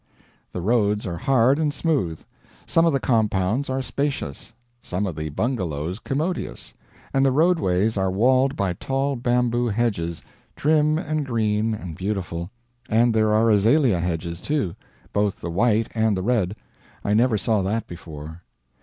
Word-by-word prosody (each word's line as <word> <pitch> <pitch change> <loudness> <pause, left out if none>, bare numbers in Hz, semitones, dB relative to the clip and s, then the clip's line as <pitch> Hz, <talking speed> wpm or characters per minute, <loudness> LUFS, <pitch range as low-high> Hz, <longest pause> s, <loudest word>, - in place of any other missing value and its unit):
The 90 - -4
roads 105 0 +1
are 85 -3 -3
hard 135 +1 +3
and 155 -2 +1
smooth; 135 - -1 0.4
some 165 0 +3
of - - +4
the 135 - +2
compounds 110 +1 +1
are 130 0 -1
spacious, 125 - -3 0.3
some 95 +1 -2
of 90 -5 -4
the 75 0 -4
bungalows 90 - -2
commodious, 155 +9 -3 0.4
and 135 - +3
the 135 - +4
roadways 125 - +2
are 95 -1 +1
walled 130 +7 +3
by 95 -3 0
tall 135 +8 -1
bamboo 120 0 +1
hedges, 100 -8 -1 0.3
trim 155 0 +2
and 155 -3 -2
green 110 -3 0
and 90 -6 -7
beautiful; 90 -3 -3 0.4
and 115 +1 +3
there 110 -1 +3
are 110 +1 +4
azalea 110 - +4
hedges, 85 0 -3
too, 145 - -1 0.4
both 100 -1 0
the 85 - -5
white 110 +4 +2
and 110 -3 +1
the 95 - -2
red; 105 -4 +1 0.5
I 100 - +2
never 115 +1 +3
saw 105 0 +1
that 105 +4 -1
before. 80 -1 -9
110 Hz, 155 wpm, -23 LUFS, 95-130 Hz, 0.5 s, of